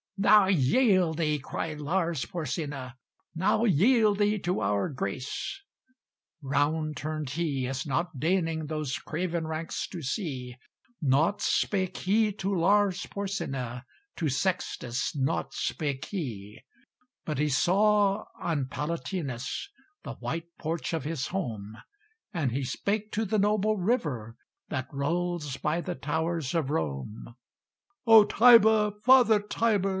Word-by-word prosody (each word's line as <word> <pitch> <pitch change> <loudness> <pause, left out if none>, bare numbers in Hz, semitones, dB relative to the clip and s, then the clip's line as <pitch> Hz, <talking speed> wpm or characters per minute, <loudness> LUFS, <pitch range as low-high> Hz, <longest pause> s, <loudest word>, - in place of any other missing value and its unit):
"Now 205 +1 +6
yield 185 - +3
thee," 150 -3 +1
cried 155 +3 -5
Lars 165 -1 -1
Porsena, 145 -5 -4 0.4
"Now 210 +7 +2
yield 210 - +4
thee 210 +1 +2
to 180 0 -1
our 100 -1 +1
grace." 140 - -4 0.8
Round 150 +3 0
turned 155 -1 -4
he, 145 -5 -1
as 135 +3 -4
not 160 +2 -2
deigning 165 -1 0
Those 155 -3 -2
craven 170 0 -3
ranks 160 +1 -3
to 175 -4 -7
see; 130 - -4 0.4
Nought 155 +8 +2
spake 190 -2 0
he 210 +3 +2
to 195 0 -2
Lars 195 +1 +2
Porsena, 135 -12 -4 0.3
To 160 -4 0
Sextus 140 -5 -2
nought 135 0 -1
spake 140 -3 -2
he; 110 - -6 0.6
But 150 -4 -3
he 150 0 +2
saw 200 +7 +3
on 150 -5 -1
Palatinus 150 - -4 0.3
The - - -6
white 165 +1 -5
porch 165 +1 -3
of 160 - -1
his 150 -2 -3
home; 110 - -4 0.5
And 160 - -1
he 135 +3 -2
spake 210 - -2
to 220 +1 0
the 215 +1 0
noble 210 +1 +2
river 150 - -1 0.3
That 130 0 -3
rolls 155 0 -2
by 155 +3 -1
the 180 0 -4
towers 160 -1 -2
of 160 -5 0
Rome. 80 - -4 0.7
"O 225 -2 +9
Tiber! 220 -2 +6
father 245 -4 +6
Tiber! 205 -1 0
165 Hz, 125 wpm, -28 LUFS, 140-200 Hz, 0.8 s, O